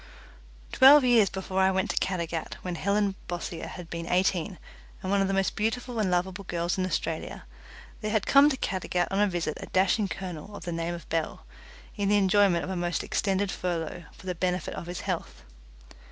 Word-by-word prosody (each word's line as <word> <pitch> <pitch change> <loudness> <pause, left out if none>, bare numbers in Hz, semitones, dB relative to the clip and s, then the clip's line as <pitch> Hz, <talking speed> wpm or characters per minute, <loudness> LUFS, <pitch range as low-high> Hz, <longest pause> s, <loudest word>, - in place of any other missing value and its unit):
Twelve 275 +2 +8
years 235 -6 +5
before 190 0 -3
I 190 - +5
went 190 0 0
to - - -5
Caddagat, 170 -3 -2
when 180 - -3
Helen 200 +3 +1
Bossier 175 -1 -5
had 180 -2 -8
been 170 0 -4
eighteen 185 0 +1 0.5
and 185 - -2
one 200 0 +3
of 195 - +2
the 195 - -1
most 195 -1 +1
beautiful 230 +2 -2
and 205 -3 +1
lovable 180 +2 -1
girls 170 0 -1
in 185 -1 -1
Australia, - - -3 0.6
there 215 - -2
had 215 -2 +1
come 280 +1 +7
to 270 - -2
Caddagat 185 -5 -1
on 195 - 0
a 210 - +4
visit 170 -5 -2
a - - -7
dashing 195 +3 +2
colonel 185 +1 -6
of - - -9
the 175 - -3
name 165 +1 -2
of 170 - -11
Bell, 165 -1 -2 0.5
in 200 -2 0
the 205 - +4
enjoyment 195 -3 +4
of 190 - -4
a - - -2
most 175 -1 -1
extended 195 0 0
furlough 175 -1 -3
for - - -16
the 185 - -1
benefit 180 0 -2
of 170 - -7
his 175 0 -5
health. - - -4
185 Hz, 200 wpm, -27 LUFS, 175-200 Hz, 0.6 s, Twelve